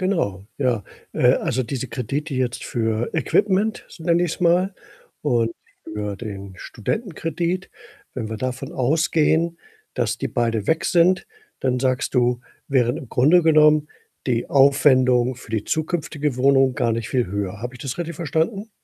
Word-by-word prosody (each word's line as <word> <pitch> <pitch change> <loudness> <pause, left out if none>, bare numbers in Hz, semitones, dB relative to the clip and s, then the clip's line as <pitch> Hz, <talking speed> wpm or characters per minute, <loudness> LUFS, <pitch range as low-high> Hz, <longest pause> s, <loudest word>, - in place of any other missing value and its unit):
Genau, 100 - -1
ja. 125 -6 0 0.3
Äh, - - +4
also, 130 - -1
diese 130 +2 -4
Kredite 140 +6 -4
jetzt 130 -2 -2
für 115 0 -1
Equipment, 200 +5 +1
so 165 - -13
nenne 170 +1 +2
ich's 175 0 -2
mal, 180 +3 +3 0.5
und 120 -6 +1 0.3
für 105 -1 -4
den 100 -3 -7
Studentenkredit. 175 - -3 0.5
Wenn 110 -3 -4
wir 110 - -4
davon 130 +2 -4
ausgehen, 160 +4 +1 0.3
dass - - -1
die - - -2
beide 115 -3 -1
weg 160 - +1
sind, 180 +2 +3 0.3
dann 125 -1 0
sagst 130 +1 0
du, 125 -1 +2 0.3
wären 125 -1 +2
im 135 -7 -8
Grunde 155 +8 +5
genommen 155 -1 +5 0.4
die 120 -2 0
Aufwendungen 130 -3 +4
für 120 - -14
die 110 -2 -1
zukünftige 155 -3 -2
Wohnung 135 0 +4
gar 120 -5 +1
nicht 115 -1 -3
viel 125 -4 +1
höher. 100 +1 -4
Habe 125 +2 -5
ich 120 - -12
das 135 +2 -4
richtig 170 -2 -4
verstanden? 170 - -1
135 Hz, 155 wpm, -22 LUFS, 120-165 Hz, 0.5 s, Grunde